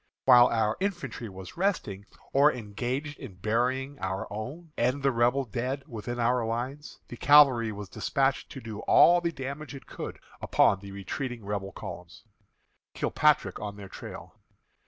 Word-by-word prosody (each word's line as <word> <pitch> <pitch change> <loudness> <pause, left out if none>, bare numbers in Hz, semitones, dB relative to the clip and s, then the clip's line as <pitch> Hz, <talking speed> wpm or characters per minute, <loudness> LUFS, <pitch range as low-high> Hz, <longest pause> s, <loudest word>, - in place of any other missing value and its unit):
While 125 -2 +8
our 110 -1 +1
infantry 180 - -3
was 95 - -10
resting, 150 - -1 0.3
or 145 +2 +6
engaged 125 +6 -4
in 95 - -9
burying 125 +8 -1
our 95 0 -3
own 145 +10 -7
and 125 +4 0
the 135 - +4
Rebel 125 +3 +2
dead 125 +5 -3
within 120 -2 -6
our 120 +1 +2
lines, 125 +6 -4
the 120 - -8
cavalry 135 -6 +6
was 105 -1 -7
despatched 135 +6 0
to 135 - -7
do 110 -2 -7
all 175 0 +6
the 170 -1 0
damage 140 +1 -6
it 135 - -11
could - - -7 0.2
upon 95 - +3
the 100 +1 -10
retreating 115 +4 -5
Rebel 100 -1 -3
columns. - - -9 0.7
KILPATRICK - - +2
ON 105 -1 -5
THEIR 100 -2 -10
TRAIL. - - -9
120 Hz, 155 wpm, -28 LUFS, 105-140 Hz, 0.7 s, While